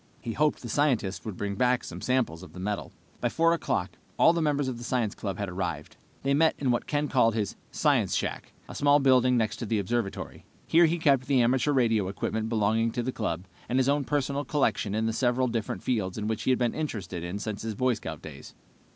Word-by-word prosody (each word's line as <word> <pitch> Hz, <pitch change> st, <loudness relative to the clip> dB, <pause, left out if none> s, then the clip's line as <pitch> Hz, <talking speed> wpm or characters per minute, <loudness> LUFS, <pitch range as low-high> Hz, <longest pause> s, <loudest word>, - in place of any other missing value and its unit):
He 115 Hz, -, -5 dB
hoped 150 Hz, +1 st, +1 dB
the -, -, -5 dB
scientists 120 Hz, -7 st, 0 dB
would 105 Hz, -5 st, -5 dB
bring 100 Hz, -1 st, -2 dB
back 125 Hz, +4 st, +2 dB
some -, -, -8 dB
samples 125 Hz, -11 st, 0 dB
of 90 Hz, -, -12 dB
the 90 Hz, -, -9 dB
metal. 105 Hz, +2 st, -3 dB, 0.3 s
By -, -, 0 dB
4 165 Hz, +1 st, +3 dB
o'clock 115 Hz, -, -1 dB, 0.3 s
all 165 Hz, -, +6 dB
the 170 Hz, -, 0 dB
members 145 Hz, -3 st, +1 dB
of 125 Hz, -2 st, -4 dB
the -, -, -8 dB
science 120 Hz, -4 st, 0 dB
club 100 Hz, -3 st, -4 dB
had 100 Hz, -, -3 dB
arrived. 85 Hz, -5 st, -4 dB, 0.3 s
They 135 Hz, 0 st, +2 dB
met 160 Hz, +3 st, +4 dB
in 135 Hz, -3 st, +1 dB
what 120 Hz, -, -1 dB
Ken 150 Hz, 0 st, 0 dB
called 115 Hz, -5 st, +3 dB
his 105 Hz, -3 st, -2 dB
"science -, -, +2 dB
shack," -, -, -3 dB, 0.2 s
a -, -, -9 dB
small 145 Hz, 0 st, +4 dB
building 130 Hz, -2 st, +4 dB
next 110 Hz, -2 st, 0 dB
to 115 Hz, -, -5 dB
the 110 Hz, -, +1 dB
observatory. 100 Hz, +1 st, -3 dB, 0.2 s
Here 170 Hz, +1 st, +5 dB
he 170 Hz, +2 st, 0 dB
kept 140 Hz, -6 st, +2 dB
the 135 Hz, -3 st, +4 dB
amateur 130 Hz, +4 st, +2 dB
radio 115 Hz, -7 st, +2 dB
equipment 110 Hz, +3 st, -2 dB
belonging 115 Hz, +1 st, +1 dB
to 120 Hz, -, -1 dB
the 130 Hz, -, -1 dB
club, 90 Hz, -7 st, -3 dB, 0.2 s
and 125 Hz, -, +1 dB
his 130 Hz, 0 st, +3 dB
own 145 Hz, 0 st, +2 dB
personal 140 Hz, 0 st, -1 dB
collections 120 Hz, -9 st, 0 dB
in 110 Hz, +1 st, 0 dB
the 115 Hz, -, 0 dB
several 125 Hz, +1 st, +1 dB
different 115 Hz, -3 st, -3 dB
fields 105 Hz, -7 st, -1 dB
in 105 Hz, -, -3 dB
which 110 Hz, 0 st, -2 dB
he -, -, -1 dB
had 130 Hz, -, +4 dB
been 120 Hz, -2 st, 0 dB
interested 95 Hz, -, -4 dB
since 105 Hz, -1 st, -4 dB
his 110 Hz, -1 st, -4 dB
Boy 130 Hz, +3 st, +2 dB
Scout 80 Hz, -8 st, -7 dB
days. 75 Hz, -3 st, -10 dB
120 Hz, 230 wpm, -28 LUFS, 105-135 Hz, 0.3 s, all